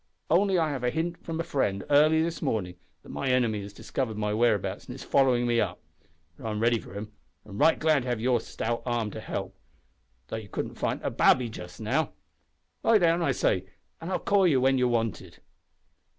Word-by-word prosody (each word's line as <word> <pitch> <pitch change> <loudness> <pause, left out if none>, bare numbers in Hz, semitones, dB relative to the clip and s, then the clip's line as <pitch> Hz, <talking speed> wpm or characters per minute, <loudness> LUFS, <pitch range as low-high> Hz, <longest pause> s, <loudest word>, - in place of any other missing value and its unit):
Only 190 +3 +4
I 160 -3 +1
have 135 -3 -3
had 125 0 0
a - - -11
hint 170 +1 -2
from 165 -1 -4
a - - 0
friend, 130 - -1
early 155 +2 +5
this 165 -1 -3
morning, 90 -5 -1 0.3
that - - -15
my 75 +2 -3
enemy 120 -5 +2
has 100 0 -8
discovered 110 +2 -4
my 105 0 -1
whereabouts, 110 -2 0
and - - -7
is - - -9
following 130 -3 +3
me 120 -1 +2
up. 95 -4 -2 0.6
But 115 - -8
I'm 105 -1 -2
ready 115 +1 +3
for 100 - -12
him, 105 +1 -6 0.3
and 100 -1 -9
right 160 +2 +5
glad 155 -3 +3
to 125 - -7
have 120 -2 -1
your 120 +1 +2
stout 115 +1 -3
arm 120 -4 -1
to - - -7
help - - -5 0.7
though - - -3
you 110 -3 -9
couldn't - - -4
fight - - -1
a - - -1
babby 125 -2 +4
just 90 -4 -9
now. - - 0 0.7
Lie 225 - +5
down, 170 -2 +3
I 160 - +2
say, 95 -7 +1 0.4
an' 165 - -5
I'll 190 - 0
call 200 -2 +3
you 140 -6 +3
when 135 +1 +3
you're 125 - +3
wanted." 115 -3 -2
125 Hz, 215 wpm, -27 LUFS, 110-160 Hz, 0.7 s, early